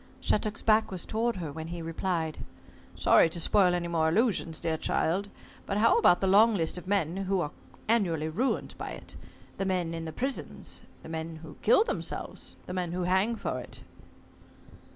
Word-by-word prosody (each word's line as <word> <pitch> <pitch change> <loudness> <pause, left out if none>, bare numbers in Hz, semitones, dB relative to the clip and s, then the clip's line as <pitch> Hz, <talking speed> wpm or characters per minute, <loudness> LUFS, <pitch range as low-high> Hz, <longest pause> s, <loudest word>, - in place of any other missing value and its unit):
Shattuck's 215 +1 0
back 220 0 +4
was 185 -3 -3
toward 230 +2 0
her 165 -5 -4
when 160 +2 -6
he 170 +1 -5
replied. 165 -1 -2 0.6
"Sorry - - +5
to 170 - -4
spoil 180 +1 +4
any 175 -1 -2
more 160 -2 +2
illusions, 180 -4 +1
dear 160 -1 -1
child, 185 +5 0 0.4
but 200 - -1
how 230 - +5
about 180 - +5
the - - +2
long 210 +4 +6
list 165 -4 0
of 180 0 -8
men 190 -3 0
who 195 0 0
are 150 -4 -2 0.4
annually 175 -9 +1
ruined 225 +12 -1
by - - -5
it? - - -10 0.4
The 195 - 0
men 180 -3 0
in 165 0 -4
the 160 - -4
prisons, 265 - -4 0.2
the - - -9
men 160 0 -4
who 155 - -10
kill 315 - +5
themselves, - - -5
the 180 - -6
men 180 -2 -2
who 180 0 -1
hang 190 +6 +2
for - - -3
it?" - - -10
180 Hz, 185 wpm, -29 LUFS, 165-205 Hz, 0.6 s, long